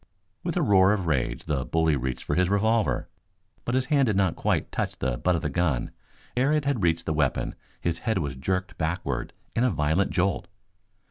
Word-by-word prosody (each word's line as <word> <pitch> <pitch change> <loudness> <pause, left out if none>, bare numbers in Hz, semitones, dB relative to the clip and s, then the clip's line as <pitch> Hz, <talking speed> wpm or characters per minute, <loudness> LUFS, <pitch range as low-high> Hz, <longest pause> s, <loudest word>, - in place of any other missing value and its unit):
With - - -2
a - - +2
roar 95 -1 +5
of 95 -4 -1
rage 65 -6 -1
the 70 -5 -1
bully 80 +1 +2
reached 65 -1 -3
for - - -2
his 90 0 +2
revolver. 110 0 +1 0.6
But 120 - 0
his 130 0 +2
hand 140 -3 +4
did 105 - +1
not 95 -3 +2
quite - - 0
touch - - -2
the 60 -1 -1
butt 90 +5 +2
of 80 - -2
the 75 - 0
gun. 70 -6 0 0.4
Ere 130 +4 +3
it 150 -2 +1
had 140 -6 0
reached 85 -1 +1
the 80 - 0
weapon 70 -3 0 0.3
his 85 -1 -1
head 110 -2 0
was 70 -6 -2
jerked 90 +4 -2
backward 80 -6 -2 0.2
in 115 - +2
a 125 - +4
violent 80 +1 +1
jolt. 90 -1 0
85 Hz, 205 wpm, -26 LUFS, 75-100 Hz, 0.6 s, roar